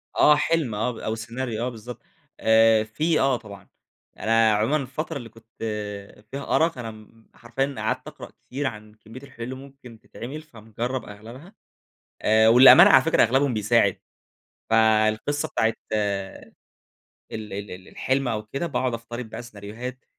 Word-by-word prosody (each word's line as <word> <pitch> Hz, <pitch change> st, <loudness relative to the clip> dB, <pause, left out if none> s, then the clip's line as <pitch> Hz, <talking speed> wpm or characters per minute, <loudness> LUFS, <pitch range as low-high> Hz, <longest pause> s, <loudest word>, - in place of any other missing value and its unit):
آه، 150 Hz, -, +6 dB
حلم 150 Hz, -6 st, 0 dB
آه، 110 Hz, +4 st, -1 dB
ب 115 Hz, -, -10 dB
أو 110 Hz, -, -3 dB
سيناريو 115 Hz, 0 st, -4 dB
آه، 125 Hz, -, -1 dB
بالضبط. 120 Hz, 0 st, -10 dB, 0.4 s
آآ، 110 Hz, 0 st, +4 dB
في 155 Hz, +9 st, 0 dB
آه، 135 Hz, -2 st, +2 dB
طبعًا. 105 Hz, -4 st, -13 dB, 0.5 s
أنا 110 Hz, 0 st, +3 dB
عمومًا 110 Hz, +8 st, +1 dB
الفترة 150 Hz, +3 st, -5 dB
اللي 120 Hz, -3 st, -9 dB
كنت 115 Hz, 0 st, -20 dB, 0.8 s
فيها 140 Hz, 0 st, -2 dB
أرق 165 Hz, -2 st, +2 dB
أنا 115 Hz, -2 st, -6 dB
م 110 Hz, -, -13 dB
م 110 Hz, +1 st, -20 dB
حرفيًا 135 Hz, +4 st, -3 dB
قعدت -, -, -3 dB
أقرأ -, -, -10 dB, 0.2 s
كتير 140 Hz, +2 st, -3 dB
عن 105 Hz, -3 st, -8 dB
كمية 110 Hz, +5 st, -13 dB
الحلول 115 Hz, -4 st, -10 dB
اللي 130 Hz, +2 st, -5 dB
ممكن 135 Hz, -4 st, -13 dB
تتعمل 140 Hz, +8 st, -9 dB
فمجرب 120 Hz, -2 st, -6 dB
أغلبها، 115 Hz, -, -12 dB, 0.7 s
آآ، 110 Hz, +1 st, +4 dB
وللأمانة 125 Hz, +3 st, +9 dB
على 130 Hz, -, +7 dB
فكرة 165 Hz, -, +3 dB
أغلبهم 130 Hz, +2 st, +2 dB
بيساعد. 105 Hz, -2 st, +2 dB, 0.7 s
فالقِصة 110 Hz, +5 st, +2 dB
بتاعة 115 Hz, 0 st, 0 dB, 0.2 s
ال 100 Hz, -2 st, -1 dB, 1.3 s
ال 100 Hz, +1 st, -6 dB
ال 95 Hz, +1 st, -10 dB
الحلم 135 Hz, 0 st, -1 dB
أو 110 Hz, -3 st, -2 dB
كده 140 Hz, +10 st, -4 dB
باقعد 130 Hz, -5 st, -1 dB
أفترض 120 Hz, +1 st, -6 dB
بقى -, -, -7 dB
سيناريوهات 120 Hz, +3 st, -9 dB
115 Hz, 155 wpm, -24 LUFS, 110-135 Hz, 1.3 s, وللأمانة